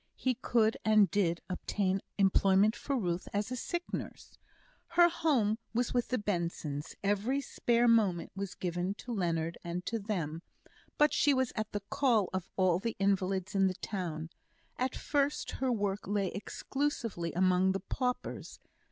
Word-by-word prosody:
He 255 - 0
could 230 -2 +2
and 215 -2 +5
did 175 -4 +1
obtain 190 +1 -1 0.2
employment 195 +2 +4
for 275 +3 -2
Ruth 175 -5 -2
as 205 +3 -1
a - - -1
sick 345 +8 -3
nurse. - - -6 0.5
Her 345 0 +5
home 255 -11 +1 0.2
was 245 0 +1
with 245 -1 +1
the 255 - 0
Bensons; 170 - -3
every 205 +7 +1
spare 240 -3 +1
moment 210 -7 +3
was 195 -1 -4
given 180 +2 -2
to 245 - -8
Leonard 170 -4 -1
and 175 +1 -4
to 230 - -1
them; 170 -7 -3 0.6
but 300 0 +4
she 285 -1 +4
was 260 -2 0
at 215 -1 -3
the 205 - -3
call 230 -9 +2
of 190 -2 -3
all 185 -2 +3
the 230 +3 -3
invalids 195 0 0
in 195 -1 +4
the 185 - -2
town. 165 -6 -4 0.4
At 255 0 -1
first 285 0 0
her 260 -1 +2
work 205 -3 -1
lay 200 -2 0
exclusively 230 - -3
among 185 +1 +3
the 195 - -1
paupers. 250 +6 -3
205 Hz, 160 wpm, -32 LUFS, 185-240 Hz, 0.6 s, and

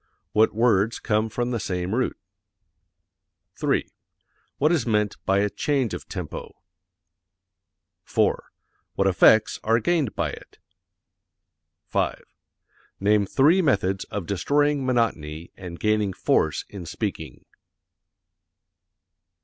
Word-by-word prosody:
What 110 +1 +4
words 110 -1 +2
come 110 -1 0
from 120 +3 -2
the 120 - -1
same 90 -1 -3
root? 125 +2 0 1.4
3. - - 0 0.7
What 150 +3 +3
is 155 -9 +1
meant 105 -2 +1
by 95 +1 +3
a 105 - +2
change 135 -7 0
of - - -7
tempo? - - -6 1.5
4. - - +1 0.5
What 95 - +1
effects 100 +3 +4
are 115 +1 +3
gained 155 -2 0
by - - -1
it? - - -13 1.3
5. - - -1 0.8
Name 100 0 +2
three 155 - +4
methods 95 - +1
of 100 -4 -5
destroying 145 - +1
monotony 85 -10 -1
and 90 -3 -9
gaining 105 -2 +1
force - - +1
in 95 -5 -9
speaking. 80 - -5
105 Hz, 110 wpm, -24 LUFS, 95-125 Hz, 1.5 s, What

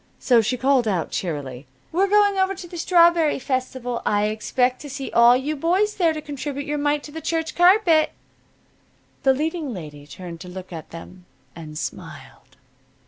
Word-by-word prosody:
So 240 -3 +4
she 245 +4 -1
called 260 -2 +2
out, 185 -6 -1
cheerily: 140 -7 -4 0.2
"We're 380 +4 +2
going 410 0 +4
over 380 0 +1
to 360 -2 -9
the 345 - -11
strawberry 340 -3 +4
festival. 255 -2 -3
I 205 0 +1
expect 250 +4 0
to 290 - -8
see 275 0 -6
all 235 +1 +6
you 290 +4 -3
boys 370 +8 +1
there 340 -4 +2
to 310 -1 -5
contribute 285 -1 -5
your 295 0 -2
mite 290 0 0
to 295 - -10
the 320 +2 -7
church 325 0 -2
carpet." 350 -3 +4 1.1
The 265 - +4
leading 305 -2 -3
lady 145 -4 -10
turned 170 +3 -9
to 185 - -9
look 185 0 -9
at 160 -2 -8
them, 180 +2 -11 0.3
and 155 -2 -9
smiled. - - -8
270 Hz, 175 wpm, -22 LUFS, 205-325 Hz, 1.1 s, all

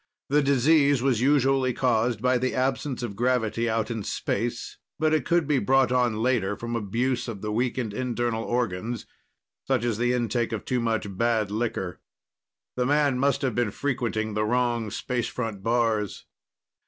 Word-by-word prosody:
The 145 +2 +4
disease 140 0 +3
was 130 -4 +2
usually 135 -1 +3
caused 115 -3 +1
by 125 0 +3
the 130 +1 -1
absence 130 0 -1
of 105 -4 -4
gravity 115 -1 0
out 110 +1 -1
in 115 -2 -3
space, 115 +4 -3 0.2
but 155 0 +2
it 155 - +1
could 170 -2 +3
be 145 -3 +2
brought 130 +3 +3
on 120 -3 +1
later 115 -6 +1
from 120 0 -4
abuse 120 +5 -1
of 110 -5 -6
the 105 - -2
weakened 120 -1 -1
internal 120 -1 -1
organs, 115 -1 -2 0.6
such 130 -3 +1
as 115 -3 -1
the 120 +1 +2
intake 120 -1 0
of 110 - -4
too 125 -1 0
much 110 -4 -1
bad 115 -3 +1
liquor. 105 -5 -2 0.8
The 125 0 0
man 145 -2 +2
must 140 +1 +1
have 130 -3 +1
been 120 -1 +1
frequenting 115 -4 -2
the 105 0 0
wrong 120 -1 0
space 120 +3 -2
front 115 -5 -4
bars. 115 -2 0
120 Hz, 165 wpm, -26 LUFS, 110-130 Hz, 0.8 s, The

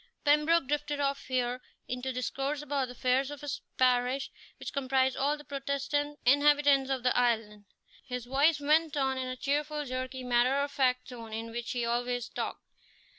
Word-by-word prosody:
Pembroke 300 +2 +4
drifted 295 0 -1
off 275 -1 -1
here 250 -1 -1 0.3
into 250 +1 -3
discourse 270 +3 -2
about 280 -2 -1
the 250 - -9
affairs 255 +2 +1
of 290 -1 -8
his 290 -2 -4 0.2
parish, 255 +1 +2 0.3
which - - -7
comprised 265 -1 +1
all 290 +2 +1
the 295 - -12
Protestant 280 +1 -2
inhabitants 285 0 +4
of 265 -2 -1
the 250 - +2
island. 220 -4 0 0.4
His 250 -2 -4
voice 285 +5 +3
went 305 +1 +2
on 265 -1 +1
in 255 0 -3
the 255 - -3
cheerful, 295 +2 -1
jerky, 255 0 -4
matter 250 +2 +3
of 285 0 -1
fact 255 -3 +1
tone 230 -3 -9
in 225 +1 -4
which 235 0 -5
he 240 -1 -1
always 245 0 -1
talked. - - -4
265 Hz, 175 wpm, -30 LUFS, 250-285 Hz, 0.4 s, Pembroke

